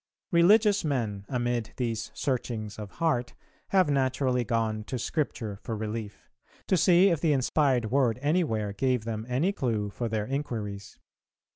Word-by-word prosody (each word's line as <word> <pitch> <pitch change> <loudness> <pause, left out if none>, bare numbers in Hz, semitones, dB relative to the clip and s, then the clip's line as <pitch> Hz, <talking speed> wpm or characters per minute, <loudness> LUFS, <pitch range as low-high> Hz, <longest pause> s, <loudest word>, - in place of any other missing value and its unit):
Religious 205 +4 +5
men, 110 -9 -2
amid 120 -3 -1
these 115 -3 -2
searchings 115 -5 -3
of 105 -2 -6
heart, 150 -8 0 0.3
have 185 -3 +3
naturally 130 -2 +1
gone 110 -1 -1
to 130 +4 -4
Scripture 115 -6 -3
for 115 -3 -4
relief; 110 -1 -5 0.4
to - - +2
see 180 +3 +5
if 165 - 0
the 160 -3 +3
inspired 130 -4 +1
word 125 -5 +2
anywhere 145 - +1
gave 125 +1 0
them 110 0 -4
any 140 +10 +1
clue 110 - -1
for 120 +2 -3
their 110 -1 -1
inquiries. 110 -7 -4
125 Hz, 145 wpm, -28 LUFS, 110-145 Hz, 0.4 s, Religious